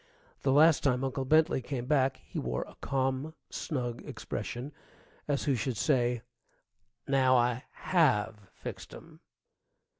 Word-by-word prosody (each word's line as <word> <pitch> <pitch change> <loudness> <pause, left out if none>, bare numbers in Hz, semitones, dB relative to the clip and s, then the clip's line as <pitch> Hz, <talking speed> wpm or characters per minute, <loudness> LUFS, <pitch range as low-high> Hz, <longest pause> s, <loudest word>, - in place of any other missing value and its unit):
The 135 - +2
last 155 +2 +6
time 130 -2 +1
Uncle 135 0 -2
Bentley 155 0 +4
came 125 -1 -4
back 135 -2 +2
he - - -5
wore 60 0 -2
a - - -14
calm, 135 +3 -1 0.2
snug 125 -7 -3
expression, 125 +5 -5 0.6
as 145 -2 0
who 140 - +2
should 120 -1 -2
say, 120 -4 +1 0.8
"Now 130 -2 +4
I 120 +1 +1
have 110 - +1
fixed - - -8
'em!" - - -14
130 Hz, 130 wpm, -30 LUFS, 120-145 Hz, 0.8 s, last